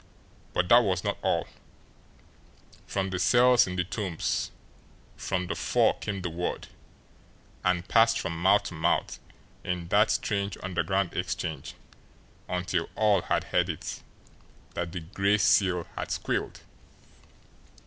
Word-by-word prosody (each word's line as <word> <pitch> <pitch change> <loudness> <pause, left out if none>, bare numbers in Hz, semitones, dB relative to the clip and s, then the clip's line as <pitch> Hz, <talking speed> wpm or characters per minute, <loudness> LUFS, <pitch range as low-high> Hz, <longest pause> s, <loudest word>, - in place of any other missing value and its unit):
But 90 - +1
that 120 - +9
was 95 -3 0
not - - -2
all - - +1 1.4
from 95 -1 -2
the 90 - -2
cells 120 +1 +5
in 90 - -4
the 90 - +1
Tombs, 90 -2 -2 0.7
from 90 -1 -2
the - - -3
four - - +2
came 100 -3 -4
the 90 - -2
word, 90 +2 -4 0.9
and 90 0 +1
passed 115 0 +4
from 85 -3 -3
mouth 100 +3 +5
to - - -6
mouth 80 -1 0 0.4
in 90 -2 -3
that 105 +3 +4
strange 100 -2 -1
underground 90 +1 -1
exchange 85 -5 -4 0.7
until 90 -2 -1
all 105 -2 +3
had - - 0
heard 90 0 0
it, 80 - -5 0.7
that 85 -1 -3
the 90 -1 -5
Gray 100 +4 +1
Seal 90 -4 +3
had - - -4
"SQUEALED." - - -2
90 Hz, 130 wpm, -28 LUFS, 90-100 Hz, 1.4 s, that